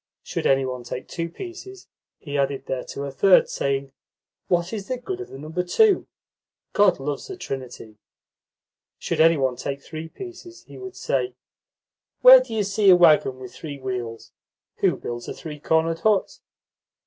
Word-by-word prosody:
Should -, -, -2 dB
any 135 Hz, 0 st, +3 dB
one 125 Hz, -1 st, -4 dB
take 120 Hz, +1 st, -7 dB
two 170 Hz, -1 st, -4 dB
pieces, 380 Hz, -, -10 dB, 0.3 s
he 145 Hz, -2 st, -7 dB
added 140 Hz, -1 st, -1 dB
thereto 130 Hz, +2 st, -4 dB
a 140 Hz, -, -4 dB
third, 185 Hz, +7 st, +5 dB
saying: 135 Hz, 0 st, -2 dB, 0.6 s
"What 175 Hz, +2 st, 0 dB
is 205 Hz, -3 st, -5 dB
the 255 Hz, -, -2 dB
good 370 Hz, +9 st, -5 dB
of -, -, -7 dB
the -, -, -9 dB
number 155 Hz, +5 st, -3 dB
2? 410 Hz, -, +3 dB, 0.7 s
God 205 Hz, -7 st, +4 dB
loves 145 Hz, -, -4 dB
a 385 Hz, -, -6 dB
trinity." 125 Hz, -, -7 dB, 1.0 s
Should -, -, -1 dB
any 165 Hz, 0 st, +6 dB
one 130 Hz, -3 st, 0 dB
take 140 Hz, 0 st, -4 dB
three 160 Hz, 0 st, -7 dB
pieces, 360 Hz, -, -10 dB
he -, -, -13 dB
would 380 Hz, 0 st, -8 dB
say: 385 Hz, -, -1 dB, 0.9 s
"Where -, -, +11 dB
do -, -, -9 dB
you 220 Hz, -2 st, 0 dB
see 200 Hz, 0 st, +2 dB
a 185 Hz, -, +9 dB
waggon 155 Hz, -6 st, +5 dB
with 130 Hz, -1 st, -10 dB
three 145 Hz, -3 st, -7 dB
wheels? 125 Hz, -4 st, -5 dB, 0.5 s
Who -, -, +2 dB
builds 120 Hz, 0 st, -6 dB
a -, -, -5 dB
three 150 Hz, -2 st, -8 dB
cornered 160 Hz, +2 st, +1 dB
hut?" 210 Hz, +1 st, +1 dB
160 Hz, 170 wpm, -24 LUFS, 135-215 Hz, 1.0 s, Where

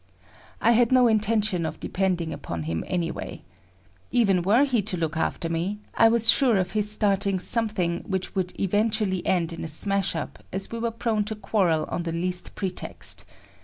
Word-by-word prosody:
I -, -, +4 dB
had 235 Hz, 0 st, +3 dB
no 255 Hz, -1 st, +5 dB
intention 215 Hz, -4 st, +1 dB
of 160 Hz, -1 st, -4 dB
depending 180 Hz, -4 st, -1 dB
upon 85 Hz, -2 st, -5 dB
him 80 Hz, +1 st, -3 dB
anyway. 175 Hz, -2 st, -4 dB, 0.7 s
Even 200 Hz, -7 st, +2 dB
were 210 Hz, +9 st, +4 dB
he 255 Hz, -6 st, +1 dB
to 195 Hz, -2 st, -3 dB
look 165 Hz, -1 st, -2 dB
after 165 Hz, +1 st, -1 dB
me, 170 Hz, +5 st, -2 dB, 0.2 s
I 225 Hz, -, +5 dB
was 225 Hz, 0 st, +2 dB
sure 250 Hz, -7 st, +4 dB
of 185 Hz, 0 st, -1 dB
his 210 Hz, -1 st, -1 dB
starting 200 Hz, -2 st, +1 dB
something 185 Hz, -4 st, +1 dB
which 190 Hz, -2 st, -3 dB
would 185 Hz, -2 st, -3 dB
eventually 205 Hz, -1 st, 0 dB
end 170 Hz, -2 st, +1 dB
in 165 Hz, -, -6 dB
a -, -, -4 dB
smash 195 Hz, +5 st, 0 dB
up -, -, -6 dB
as 195 Hz, +1 st, -3 dB
we 230 Hz, -, -4 dB
were 235 Hz, 0 st, 0 dB
prone 225 Hz, -2 st, -1 dB
to 220 Hz, +1 st, -4 dB
quarrel 190 Hz, -6 st, +1 dB
on -, -, -2 dB
the 170 Hz, -1 st, -3 dB
least 180 Hz, +2 st, -3 dB
pretext. 190 Hz, -3 st, -4 dB
195 Hz, 180 wpm, -25 LUFS, 175-220 Hz, 0.7 s, no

